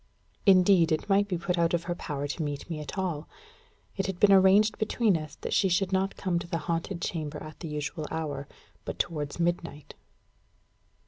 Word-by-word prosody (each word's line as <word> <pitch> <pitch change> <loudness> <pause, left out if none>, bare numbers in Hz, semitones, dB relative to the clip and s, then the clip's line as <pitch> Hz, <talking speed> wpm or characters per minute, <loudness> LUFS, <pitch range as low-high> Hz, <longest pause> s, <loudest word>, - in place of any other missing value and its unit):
Indeed, 185 -3 +6
it 155 - 0
might 200 +1 +4
be 185 -3 -1
put 175 +1 -1
out 170 0 +3
of 170 - -2
her 175 - -2
power 145 -4 -4
to 145 - -4
meet 145 -2 -4
me 155 - -3
at 150 +6 -7
all. 175 -5 -2 0.7
It 195 -2 -1
had 190 -2 -4
been 205 - +6
arranged 195 +3 +5
between 215 -2 +2
us 155 -3 -5
that - - -3
she 195 - +3
should 185 +2 +1
not 190 +1 +1
come 180 -3 0
to 170 - -7
the 170 - -1
haunted 170 +1 -2
chamber 155 -3 -3
at 155 0 -10
the 170 - -6
usual 150 +1 -4
hour, 145 -4 -4 0.4
but - - -5
towards 150 -2 -3
midnight. 170 -3 -2
170 Hz, 195 wpm, -28 LUFS, 155-190 Hz, 0.7 s, Indeed